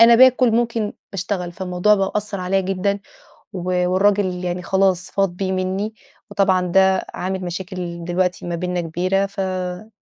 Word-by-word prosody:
أنا 235 Hz, +1 st, +9 dB
باكل، 255 Hz, 0 st, +6 dB
ممكن 230 Hz, -2 st, 0 dB, 0.2 s
باشتغل، 185 Hz, -2 st, -3 dB
فالموضوع 185 Hz, +3 st, +2 dB
بقى 195 Hz, -1 st, 0 dB
أثرعليَّ 195 Hz, -2 st, -1 dB
جدًا، 195 Hz, +2 st, -1 dB, 0.5 s
و 180 Hz, 0 st, 0 dB
والراجل 185 Hz, -1 st, +2 dB
يعني 180 Hz, 0 st, -2 dB
خلاص 190 Hz, 0 st, +1 dB
فاض 195 Hz, -1 st, +2 dB
بيه 190 Hz, -1 st, -1 dB
منّي، 190 Hz, +3 st, -1 dB, 0.4 s
وطبعًا 190 Hz, -2 st, +3 dB
ده 190 Hz, +1 st, +3 dB
عامل 190 Hz, +1 st, -3 dB
مشاكل 175 Hz, -1 st, -5 dB
دلوقتي 180 Hz, 0 st, 0 dB
ما 170 Hz, -, -2 dB
بيننا 180 Hz, 0 st, -2 dB
كبيرة، 185 Hz, +4 st, 0 dB
فأنا 185 Hz, 0 st, -4 dB
190 Hz, 145 wpm, -21 LUFS, 180-200 Hz, 0.5 s, أنا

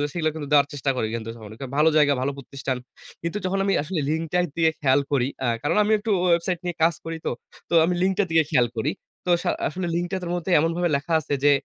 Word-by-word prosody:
গুলো 145 Hz, -, 0 dB
সেগুলো 155 Hz, -2 st, +1 dB
কিন্তু 150 Hz, -3 st, -6 dB
দেওয়ার 145 Hz, -1 st, +5 dB
চেষ্টা 140 Hz, -1 st, -1 dB
করি 110 Hz, -, 0 dB
কিন্তু 115 Hz, -1 st, -4 dB
স -, -, -12 dB, 0.4 s
ভালো 155 Hz, +2 st, +5 dB
জায়গা 150 Hz, -2 st, +5 dB
ভালো 140 Hz, +2 st, 0 dB
প্রতিষ্ঠান। 135 Hz, -1 st, -4 dB, 0.5 s
কিন্তু 170 Hz, +5 st, -2 dB
যখন 190 Hz, +1 st, 0 dB
আমি 195 Hz, -, +2 dB
আসলে 160 Hz, +2 st, -2 dB
লিঙ্কটা 165 Hz, +2 st, -1 dB, 0.2 s
দিয়ে 165 Hz, -1 st, +4 dB
খেয়াল 135 Hz, -1 st, +4 dB
করি 130 Hz, -2 st, +2 dB, 0.2 s
আ -, -, +2 dB, 0.2 s
কারণ 145 Hz, -, +1 dB
আমি 215 Hz, -, +1 dB
একটু 215 Hz, +2 st, -4 dB
ওয়েবসাইট 175 Hz, 0 st, +2 dB
নিয়ে 175 Hz, -1 st, -3 dB
কাজ 165 Hz, +1 st, +4 dB
করি 165 Hz, 0 st, -4 dB
তো। -, -, +1 dB, 0.4 s
তো -, -, 0 dB
আমি 180 Hz, -, +1 dB
লিঙ্কটা 190 Hz, +2 st, +2 dB
দিকে 160 Hz, 0 st, +5 dB
খেয়াল 125 Hz, -6 st, +4 dB
করি। 135 Hz, +7 st, 0 dB, 0.4 s
তো -, -, +1 dB
সা -, -, +1 dB, 0.2 s
আসলে 180 Hz, +3 st, -4 dB
লিঙ্কটার 175 Hz, +2 st, -2 dB
তো 170 Hz, -, -4 dB
মধ্যে 175 Hz, +1 st, -4 dB
এমনভাবে 165 Hz, +2 st, +1 dB
লেখা 145 Hz, +4 st, -4 dB
আছে 145 Hz, -, -2 dB
যে, 145 Hz, -, +7 dB
160 Hz, 230 wpm, -24 LUFS, 145-175 Hz, 0.5 s, যে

